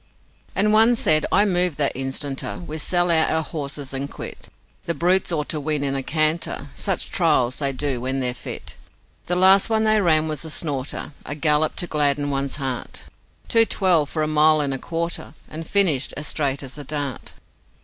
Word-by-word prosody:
And 210 +2 +2
one 225 +3 +5
said, 155 -8 +2
'I 205 +2 +4
move 180 -4 +1
that 145 -2 +1
instanter 135 +1 -3
We 155 0 -5
sell 175 +3 +1
out 160 -1 +4
our 160 0 +1
horses 145 -4 -6
and 135 +1 -3
quit, - - -9 0.4
The 170 - -1
brutes 180 +2 +2
ought 150 -3 -2
to 155 - -1
win 150 0 -2
in 135 -1 0
a 135 - -1
canter, 155 +4 -1
Such - - -1
trials 125 0 +1
they 140 -2 0
do 135 -2 -2
when 130 +2 -1
they're 125 -2 -1
fit. - - -8 0.5
The 180 - +1
last 190 +3 +5
one 220 -1 +2
they 215 -1 +3
ran 160 -3 +3
was 155 -1 -2
a 160 - -5
snorter 145 -4 -2
A 145 - -5
gallop 150 0 +3
to - - -2
gladden 145 -2 +1
one's 135 0 -2
heart 135 -4 -4 0.4
Two 230 -1 +5
twelve 180 -9 +2
for 155 - -2
a - - 0
mile 155 0 +4
and 140 -2 -1
a 135 - -3
quarter, 170 +1 -4
And 160 +1 -8
finished 165 -10 +1
as 145 - -4
straight 140 -3 -1
as 135 +2 -7
a - - -6
dart. 140 -3 -4
155 Hz, 195 wpm, -22 LUFS, 140-170 Hz, 0.5 s, one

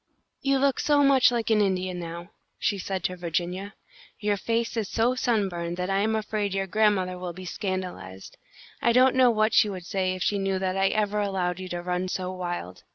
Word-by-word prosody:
"You 275 0 +2
look 275 0 +2
so 290 -1 +3
much 270 -3 +5
like 230 -2 -1
an 215 -1 +4
Indian 185 -2 0
now," 170 +2 -7 0.3
she 200 0 0
said 190 -1 -3
to 185 - -1
Virginia. 180 +3 -3 0.4
"Your 205 -1 +1
face 230 +3 -1
is 220 -4 -2
so 235 +2 +2
sunburned 190 -9 -1
that 180 +1 -2
I 195 - +2
am 220 +2 +1
afraid 210 -2 -2
your 195 0 0
grandmother 190 -3 +1
will 180 -1 -5
be 185 +2 -9
scandalised. 180 - -5 0.5
I 235 - +3
don't 255 +1 +5
know 260 -1 +5
what 215 -1 +2
she 215 - +5
would 185 -3 -6
say 185 0 -1
if 185 - -3
she 205 - +1
knew 195 -1 0
that 185 0 -1
I 195 0 +3
ever 210 0 0
allowed 185 -3 -1
you 185 -1 -6
to 175 0 -4
run 180 +1 -1
so 185 0 -3
wild. 175 - -5
195 Hz, 210 wpm, -26 LUFS, 180-215 Hz, 0.5 s, much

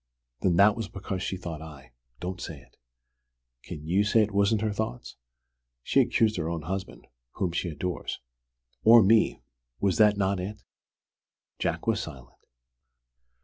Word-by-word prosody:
"Then 90 -3 +2
that 100 +3 +6
was 115 -3 -4
because 95 -1 -5
she 95 - -3
thought 85 -3 -6
I 70 -5 -12
" - - -45
"Don't 90 +1 -5
say - - -6
it!" - - -22 0.9
"Can 75 +4 -9
you 95 +5 +2
say 110 +1 +4
it 105 - -3
wasn't 100 +2 +2
her 110 -1 0
thought?" 60 -10 -4 0.7
"She's - - +4
accused 110 -2 +2
her 80 -1 -2
own 85 -2 -4
husband 95 +4 -5 0.3
whom 90 -3 -1
she 85 +1 -2
adores." 85 +3 -4 0.6
"Or 115 0 +8
me! 110 +3 +3 0.4
Was 100 +3 +1
that 105 -1 +5
not 95 -1 +1
it?" 100 +3 -6 1.0
Jack - - -2
was - - +1
silent. 60 -3 -9
95 Hz, 155 wpm, -27 LUFS, 85-105 Hz, 1.0 s, Or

